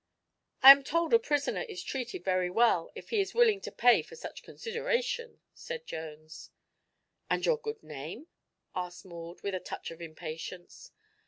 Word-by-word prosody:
"I 270 - +14
am 275 0 +7
told 335 - 0
a 460 - +8
prisoner 285 - 0
is 180 0 -6
treated 240 -5 -4
very 185 -1 +1
well, 185 -4 +3
if - - -10
he 435 - +3
is 390 +1 -4
willing 450 -4 +4
to - - -6
pay 245 0 +5
for - - -13
such 475 - -8
consideration," 480 0 -3
said 485 0 -7
Jones. 155 0 -8 0.8
"And - - +1
your 480 -2 +2
good 440 -1 -6
name?" 155 - -8 0.5
asked 180 0 -5
Maud, 170 -1 -10
with 200 - -2
a 185 - -1
touch - - -7
of 165 +1 -11
impatience. 165 - -8
240 Hz, 165 wpm, -30 LUFS, -, 0.8 s, I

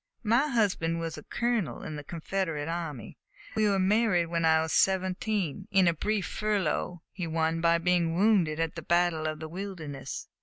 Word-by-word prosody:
My 235 +7 +3
husband 195 - +1
was 165 -1 -4
a - - -10
colonel 235 -6 -1
in 155 - -5
the 145 - -6
Confederate 165 -1 -3
army. 165 -8 -5 0.4
We 215 -1 +3
were 200 - +2
married 190 -3 +2
when 170 -1 0
I 160 0 +4
was 160 - -3
seventeen, 190 -1 +1
in 190 -3 +4
a 170 - +4
brief 205 +3 -1
furlough 195 -4 -1
he 180 -3 -4
won 160 0 0
by 170 0 +4
being 170 -1 +1
wounded 180 -6 +3
at 165 -1 0
the 170 - -6
battle 170 -1 +1
of 155 0 -3
the 160 - -6
Wilderness. 165 -6 -6
175 Hz, 180 wpm, -29 LUFS, 160-195 Hz, 0.4 s, I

